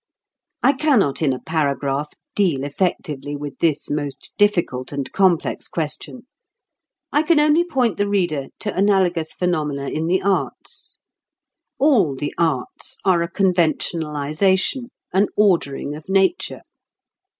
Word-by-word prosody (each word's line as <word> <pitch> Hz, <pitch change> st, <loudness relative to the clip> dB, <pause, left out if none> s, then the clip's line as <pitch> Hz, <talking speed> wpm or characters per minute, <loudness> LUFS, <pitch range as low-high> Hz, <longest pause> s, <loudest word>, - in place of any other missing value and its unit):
I 275 Hz, -, +5 dB
cannot 260 Hz, -, +2 dB
in 150 Hz, -4 st, +3 dB
a 130 Hz, -, -2 dB
paragraph 140 Hz, 0 st, -1 dB, 0.2 s
deal 170 Hz, -10 st, +1 dB
effectively 145 Hz, -2 st, -2 dB
with 145 Hz, -1 st, -7 dB
this 155 Hz, -3 st, +1 dB
most 145 Hz, -2 st, -3 dB
difficult 175 Hz, -11 st, +1 dB
and 140 Hz, -2 st, -4 dB
complex 185 Hz, -4 st, +1 dB
question. 170 Hz, +10 st, -4 dB, 0.9 s
I 295 Hz, -, +3 dB
can 315 Hz, 0 st, +3 dB
only 305 Hz, +3 st, +4 dB
point 255 Hz, -, 0 dB
the 205 Hz, -, +1 dB
reader 175 Hz, -9 st, 0 dB
to 210 Hz, -, -3 dB
analogous 185 Hz, -5 st, +2 dB
phenomena 150 Hz, -6 st, -1 dB
in 160 Hz, +1 st, -2 dB
the 185 Hz, +2 st, +1 dB
arts. 195 Hz, -1 st, -3 dB, 0.8 s
All 235 Hz, -, +3 dB
the 145 Hz, +2 st, -4 dB
arts 155 Hz, -7 st, -1 dB
are 180 Hz, -3 st, +4 dB
a 170 Hz, -, -2 dB
conventionalization, 175 Hz, -, 0 dB, 0.2 s
an 195 Hz, +2 st, +3 dB
ordering 165 Hz, -8 st, +1 dB
of 155 Hz, +4 st, -10 dB
nature. 195 Hz, -, +1 dB
170 Hz, 125 wpm, -21 LUFS, 145-200 Hz, 0.9 s, I